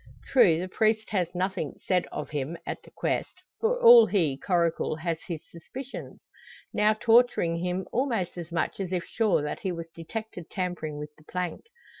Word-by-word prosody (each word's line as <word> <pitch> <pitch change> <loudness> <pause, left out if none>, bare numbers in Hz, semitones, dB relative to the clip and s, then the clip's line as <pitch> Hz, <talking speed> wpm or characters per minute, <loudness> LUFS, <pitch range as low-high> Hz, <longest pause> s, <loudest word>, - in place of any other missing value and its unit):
True, 180 -11 +5
the 180 +2 -3
priest 220 +3 +1
has 180 -4 -1
nothing 185 -4 -2
said 185 -2 +1
of - - -5
him 150 +3 -3
at - - -4
the - - -17
'quest; - - -2 0.2
for - - +1
all 475 -1 +9
he, 165 -9 +1
Coracle, 170 0 0
has 160 0 -2
his 165 -3 -4
suspicions; 255 +11 -8 0.5
now 210 +1 +4
torturing 225 -7 +4
him 180 +2 -2
almost 235 -8 0
as 170 -1 -7
much 170 - -1
as 190 -2 -3
if 180 -2 -1
sure 215 -9 +1
that 150 - -3
he 190 - -2
was 165 -1 -6
detected 180 +1 -7
tampering 175 -5 -3
with 150 0 -6
the - - -19
plank. 180 - -4
180 Hz, 175 wpm, -27 LUFS, 165-215 Hz, 0.5 s, all